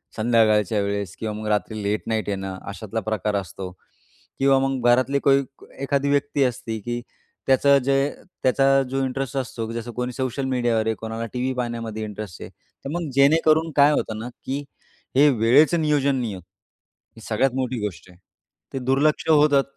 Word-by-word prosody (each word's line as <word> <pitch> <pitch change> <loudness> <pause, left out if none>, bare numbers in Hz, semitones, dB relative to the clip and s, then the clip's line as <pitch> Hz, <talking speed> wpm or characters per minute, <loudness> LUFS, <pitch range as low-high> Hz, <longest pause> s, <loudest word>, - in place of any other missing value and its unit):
संध्याकाळच्या 110 -3 +3
वेळेस 100 -2 -3
किंवा 110 -1 -3
मग 110 - -5
रात्री 105 0 -1
लेट 105 +1 -1
नाईट 110 -2 -1
येणं 95 -1 -4
अशातला 110 +2 -4
प्रकार 105 -1 -1
असतो 95 -1 -5 0.7
किंवा 135 0 +4
मग 135 -2 0
घरातली 130 +3 +3
कोई 140 0 +4 0.4
एखादी 140 +1 0
व्यक्ती 145 0 +1
असते, 115 -3 -2
की 120 +3 -4 0.5
त्याचं 140 +1 +5
जे 135 +1 +2 0.5
त्याचा 135 +1 +4
जो 135 0 -1
इंटरेस्ट 135 +1 -3
असतो, 120 -3 -3
की 115 - -6
जसं 115 +1 -5
कोणी 125 +1 -3
सोशल 130 +1 -2
मीडियावर 120 -4 +1
आहे, 110 - +1
कोणाला 115 +1 -5
टीव्ही 130 +1 -1
पाहण्यामध्ये 115 -3 -4
इंटरेस्ट 105 -4 -8
आहे. - - -7
तर 135 - -13
मग 170 -4 -3
जेणेकरून 155 +3 +4
काय 145 +1 +6
होतं 110 -6 -1
ना, 120 +2 -5
की 140 +2 -3 0.5
हे 145 +2 +6
वेळेचं 135 +7 +4
नियोजन 145 -3 +2
नाही 120 -5 -2
होत. 90 - -8 0.7
ही 115 - -13
सगळ्यात 125 +4 +2
मोठी 130 -2 -2
गोष्ट 95 -2 -7
आहे. 90 - -20 0.6
ते 135 - -2
दुर्लक्ष 140 +5 +2
होतात. 145 -3 +5
125 Hz, 170 wpm, -23 LUFS, 110-140 Hz, 0.7 s, काय